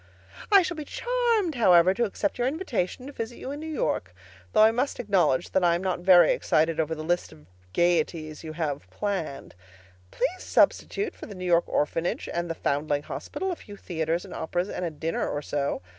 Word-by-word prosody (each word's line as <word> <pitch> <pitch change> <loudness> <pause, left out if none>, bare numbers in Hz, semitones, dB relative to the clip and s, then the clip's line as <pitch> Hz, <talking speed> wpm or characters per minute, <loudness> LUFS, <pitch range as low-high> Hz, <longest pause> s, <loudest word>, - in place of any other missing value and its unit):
I 395 -2 +8
shall 345 -1 -3
be 305 - -4
charmed, 470 - 0
however, 185 -7 +5
to 235 +3 +1
accept 200 +1 -2
your 245 - +2
invitation 260 - -2
to 285 - -8
visit 230 0 -5
you 265 - -6
in 290 - -5
New 315 +1 -6
York, 90 - -2 0.4
though 215 - +5
I 220 - +7
must 255 +5 -1
acknowledge 180 - +1
that 190 - +2
I 170 -1 +4
am 175 - -3
not 185 -2 -1
very 175 -2 +6
excited 160 +1 +1
over 160 0 0
the 155 - -6
list 175 +2 -1
of 75 -1 -16 0.3
gaieties 160 - 0
you 155 -1 -6
have 150 -3 -3
planned. 195 -9 -4 0.6
Please 295 - -2
substitute 410 +2 +1
for - - -10
the 205 - -9
New 185 0 -6
York 175 -1 +3
Orphanage 165 +3 -1
and 170 0 -2
the 165 - -2
Foundling 145 -1 -1
Hospital 380 - -4
a - - -2
few 205 -9 -12
theaters 165 0 -2
and 190 - -10
operas 175 +4 -2
and - - -4
a 170 - 0
dinner 160 +1 -2
or 145 - -3
so. 140 -9 -2
180 Hz, 205 wpm, -26 LUFS, 160-245 Hz, 0.6 s, I